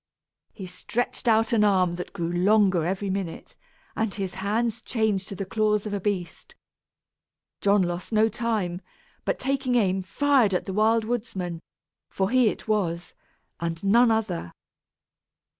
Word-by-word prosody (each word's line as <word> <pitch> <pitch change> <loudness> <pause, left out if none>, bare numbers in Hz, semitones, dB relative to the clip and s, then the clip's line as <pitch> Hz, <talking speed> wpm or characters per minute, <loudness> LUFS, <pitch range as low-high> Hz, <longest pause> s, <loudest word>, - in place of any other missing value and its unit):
He 195 - -9
stretched 230 +7 -3
out 225 0 +3
an 215 -2 +4
arm 185 -4 +3
that 180 +1 -6
grew 170 -3 -3
longer 190 -1 +3
every 195 +1 -2
minute, 190 -4 -5 0.4
and 220 -2 0
his 195 -2 -4
hands 220 +4 -1
changed 220 -5 -1
to 195 - -7
the 195 - -4
claws 210 +1 +1
of 210 - -4
a 200 - -1
beast. 185 -4 -4 1.1
John 200 -1 +4
lost 175 +3 -4
no 220 0 +4
time, 210 -6 -2 0.4
but - - 0
taking 265 -1 -1
aim 190 -5 +2
fired 250 0 +2
at - - -1
the 190 - -4
Wild 220 +2 +3
Woodsman, 195 -8 -3 0.5
for 190 +2 -1
he 255 -2 +4
it - - -7
was, 175 -5 -1 0.5
and 165 +1 -4
none 230 +5 +5
other. 205 - -1
200 Hz, 150 wpm, -25 LUFS, 185-225 Hz, 1.1 s, none